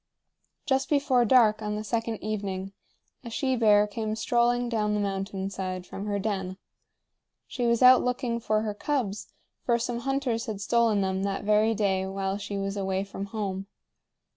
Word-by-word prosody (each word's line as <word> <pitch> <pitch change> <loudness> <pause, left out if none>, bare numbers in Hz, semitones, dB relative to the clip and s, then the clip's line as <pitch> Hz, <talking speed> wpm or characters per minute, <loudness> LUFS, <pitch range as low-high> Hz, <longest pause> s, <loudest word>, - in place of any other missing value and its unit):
Just 270 -1 +1
before 275 -4 +3
dark 220 -3 +4
on 210 0 -2
the 210 - -4
second 225 0 -2
evening, 195 -2 -3 0.5
a 235 - -7
she 260 +3 0
bear 210 -3 +5
came 215 +1 -3
strolling 240 +2 +1
down 210 -3 0
the - - 0
mountain 195 -1 -3
side 185 -2 -4
from 200 +3 -7
her 205 -1 0
den. 190 -2 -3 0.9
She 245 -2 -2
was 235 +1 +2
out 255 0 +8
looking 245 -1 -1
for 215 -2 0
her 215 -1 -2
cubs, 215 -3 -3 0.3
for 235 -1 +2
some 235 0 -3
hunters 260 -3 -1
had 215 -3 -4
stolen 225 0 +2
them 190 0 -1
that 195 0 -2
very 215 +2 +3
day 190 -2 0
while 195 +1 -2
she 205 0 -5
was 195 0 -3
away 190 -1 -1
from 195 0 -6
home. 195 -2 -4
210 Hz, 170 wpm, -27 LUFS, 195-235 Hz, 0.9 s, out